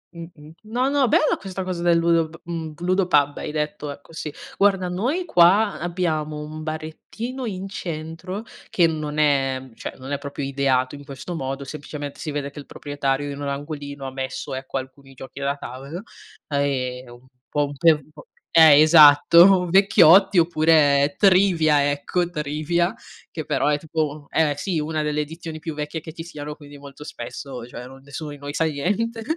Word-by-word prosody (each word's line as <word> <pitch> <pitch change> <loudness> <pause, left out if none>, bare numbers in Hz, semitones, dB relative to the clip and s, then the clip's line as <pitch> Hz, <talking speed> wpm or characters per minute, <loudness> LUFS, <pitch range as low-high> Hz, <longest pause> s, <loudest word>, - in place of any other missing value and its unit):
Mh-mh, 165 -3 -11
no, 245 +5 0
no, 280 -3 +2
bella - - +3
questa 190 0 -5
cosa 185 -2 -4
del 170 -1 +3
ludo 165 -1 +2
p 165 - -13
mhmm, 165 -2 -5
Ludo 185 +1 +1
Pub, 145 -4 +3
hai - - -5
detto 150 +1 -3
ecco, 145 +3 -11
sì. 155 -2 -5 0.3
Guarda 195 -2 +3
noi 250 - -1
qua 195 - +4
abbiamo 160 -3 -2
un 155 +1 -7
barettino 160 +11 -6
in 195 -1 -5
centro, 170 +3 -6 0.3
che 175 - +3
non 155 -2 -2
è 135 -3 +1
cioè - - -7
non 135 +2 -9
è 140 - -1
proprio 140 0 -6
ideato 135 -1 0
in 145 - -9
questo 140 +5 -8
modo, 135 -2 -4
semplicemente 145 0 -7
si 155 - -5
vede 145 -1 -4
che 145 - -10
il 140 - -11
proprietario 145 0 -3
in 140 - -7
un 145 - -3
angolino 145 -1 -6
ha 135 - -5
messo, 130 0 -5
ecco, 130 +1 -4
alcuni 135 +1 -9
giochi 135 +2 -10
da 140 0 -1
tavolo, 140 +6 -8 0.5
ehm, 130 -3 -2
un 120 +2 -16 0.2
po' 145 -1 +1
un 145 0 -7
pe 165 +4 +5
un 150 0 -9
po' - - -15 0.3
eh, 155 -3 +8
esatto, 165 +4 +7
vecchiotti 195 0 +6
oppure 155 -4 +4
Trivia, 170 -7 +4
ecco, 170 +5 -1
Trivia, 155 +3 -1 0.4
che 155 -3 -6
però - - 0
è 145 0 +1
tipo 155 -2 -3
eh 155 -2 +2
sì, 170 0 -2
una 155 +1 -2
delle 150 0 -1
edizioni 160 +1 -7
più 160 0 -6
vecchie 150 +2 -5
che 160 0 -10
ci 165 - -8
siano, 150 -3 -7
quindi 145 -1 -13
molto 140 0 -12
spesso 130 -4 -8
cioè 125 +1 -9
non 135 +1 -14
nessuno 140 +2 -7
di 145 - -8
noi 145 +1 -7
sa 165 - +1
niente, 205 +10 -1
155 Hz, 180 wpm, -23 LUFS, 140-170 Hz, 0.5 s, eh